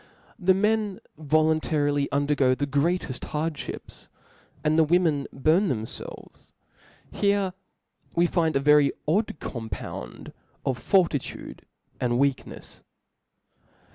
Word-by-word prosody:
the 190 -1 +4
men 210 -1 +1 0.2
voluntarily 155 -2 +1
undergo 140 -2 +2
the 145 - -1
greateft 145 0 0
hard(hips; 155 0 -5 0.6
and 155 0 +2
the 160 - +5
women 160 -3 +2
burn 160 +8 +2
themfelves: 110 -3 -7 0.6
here 200 -2 +1 0.6
wis 170 +1 +4
find 165 -2 +1
a - - +4
very 145 0 +5 0.2
odd 200 +8 +2
cooipound 115 -3 -7 0.3
of 130 -3 -1
fortitude 170 -5 0 0.3
and 125 -1 0
weaknefs. 135 +2 -2
155 Hz, 100 wpm, -26 LUFS, 140-175 Hz, 0.6 s, the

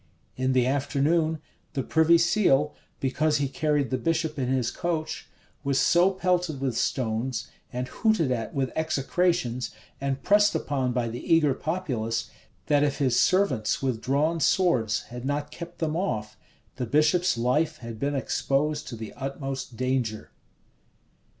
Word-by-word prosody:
In 130 0 0
the 125 -1 +3
afternoon, 145 +4 +1 0.4
the 135 -3 -1
privy 160 +4 +4
seal, 165 -5 +3 0.3
because 150 +3 +1
he 145 -1 0
carried 145 -1 0
the 130 - 0
bishop 160 +1 -1
in 130 - 0
his 130 -2 0
coach, 165 -3 -3 0.3
was 140 -1 +1
so 175 +2 +5
pelted 180 -5 0
with 135 -3 -1
stones, 115 -1 -1 0.2
and 125 0 -3
hooted 220 - +1
at 115 -3 -2
with 135 -2 -1
execrations, 160 -3 0 0.3
and 135 -1 -2
pressed 205 +1 +4
upon 130 -3 -1
by 120 -1 0
the 115 +1 -6
eager 155 -4 +5
populace, 130 -10 -2 0.3
that 145 -1 +3
if 145 -1 +1
his 130 -4 +2
servants 140 - +2
with 125 -4 -1
drawn 150 +5 +1
swords 130 - +2
had 125 0 -6
not 145 +2 -2
kept 170 +2 -9
them 155 -1 -1
off, 110 - -2 0.4
the 125 -2 -2
bishop's 155 +4 +3
life 150 +7 +1
had 115 -2 -8
been 140 +1 -1
exposed 145 +2 0
to 120 - -6
the 110 -1 -8
utmost 135 -2 -5
danger. 125 -4 -1
140 Hz, 150 wpm, -26 LUFS, 125-160 Hz, 0.4 s, so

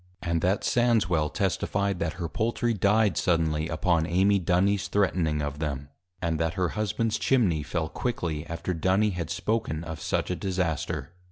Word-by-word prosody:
_ - - -5
And 85 -1 +1
that 95 +4 +1
Sandswel 100 -11 +2
testifi'd, 100 -2 0
that 80 - -1
her 85 -1 -4
Poultry 115 +8 0
dy'd 105 0 +2
suddenly, 80 -2 +1
upon 80 0 +1
Amy 95 +4 +3
Dunys 95 +3 +2
threatning 85 -7 +1
of 75 0 -4
them; 70 -2 -3 0.3
and 80 -2 0
that 80 +1 0
her 90 -3 +1
Husbands 110 +1 -1
Chimney 100 - +2
fell, 80 +2 -2
quickly 85 -9 -3
after 85 +2 -3
Duny 95 +5 +2
had 85 -3 -4
spoken 105 -9 -1
of 80 -2 -6
such - - -1
a - - 0
disaster. 90 -3 -2
90 Hz, 165 wpm, -27 LUFS, 80-100 Hz, 0.3 s, Amy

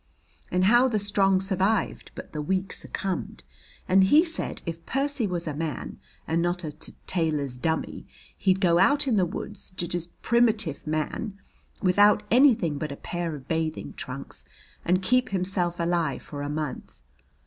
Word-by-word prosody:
"And 180 0 +1
how 240 +6 +6
the 230 -4 0
strong 195 -2 +3
survived, 195 +2 0
but - - -9
the 150 - -3
weak 190 +4 -1
succumbed, 195 -2 -4 0.4
and 190 +1 +5
he 300 - +6
said 325 -1 -3
if 165 -1 -5
Percy 275 -4 0
was 175 -2 -2
a 155 - -3
man, 155 -1 -4 0.3
and 165 +1 +1
not 175 +1 -1
a 155 - -4
t 155 - -4
tailor's 150 -7 -1
dummy, 160 +4 -2 0.3
he'd 190 -1 +2
go 175 -3 +4
out 285 +9 +4
in 245 - +2
the 185 -3 +3
woods, 200 +2 -7
j 175 - 0
just 170 0 -5
primitive 220 -11 +2
man, 155 +7 -2 0.5
without 205 +3 +5
anything 225 - +4
but 155 -2 -3
a 140 - -6
pair 175 -2 -4
of 135 -2 -11
bathing 160 -1 -2
trunks, 130 +2 -6 0.4
and 185 +2 +1
keep 250 +4 +2
himself 180 -2 -1
alive 170 -4 0
for 145 -1 -7
a 145 - -3
month. 150 - -5
180 Hz, 165 wpm, -26 LUFS, 160-205 Hz, 0.5 s, how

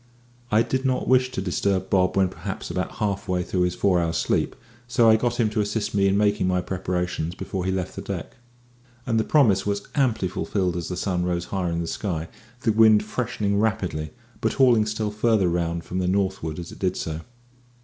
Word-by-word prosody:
I 110 +2 +5
did 130 +2 -1
not 130 -1 0
wish 130 0 +4
to 125 -7 -3
disturb 95 0 -1
Bob 90 0 +2
when 95 -1 +4
perhaps 95 +2 -6
about 90 - -3
half 100 -2 -2
way 90 -1 0
through 90 +1 -1
his 90 0 +1
four 95 -2 +2
hours' 85 0 -1
sleep, - - 0 0.3
so 120 -1 +3
I 110 - +7
got 120 +2 -1
him 115 - +4
to 105 - +1
assist 105 +1 -2
me 100 -1 +3
in 100 +1 +2
making 105 -2 +2
my 90 0 +2
preparations 90 -2 -2
before 95 -3 -4
he 95 - +1
left 95 -1 -3
the - - -5
deck. - - -6 0.7
And 115 -2 +1
the - - +2
promise 110 -11 +4
was 100 0 -1
amply 120 -9 +1
fulfilled 90 -1 -1
as 85 -2 -3
the 90 - -4
sun 90 -2 -1
rose 90 -1 -1
higher 90 -3 0
in 85 0 -1
the - - -2
sky, 85 -4 -3 0.3
the 120 -4 +2
wind 110 -1 +6
freshening 105 -3 -1
rapidly, 90 -8 -1 0.3
but - - 0
hauling 120 -5 +4
still 110 -1 -2
farther 105 -2 +2
round 85 -1 -1
from 90 - -4
the 90 - 0
northward 95 -5 -1
as 85 -1 -7
it - - -12
did 95 -2 0
so. 80 0 -4
95 Hz, 210 wpm, -24 LUFS, 90-110 Hz, 0.7 s, I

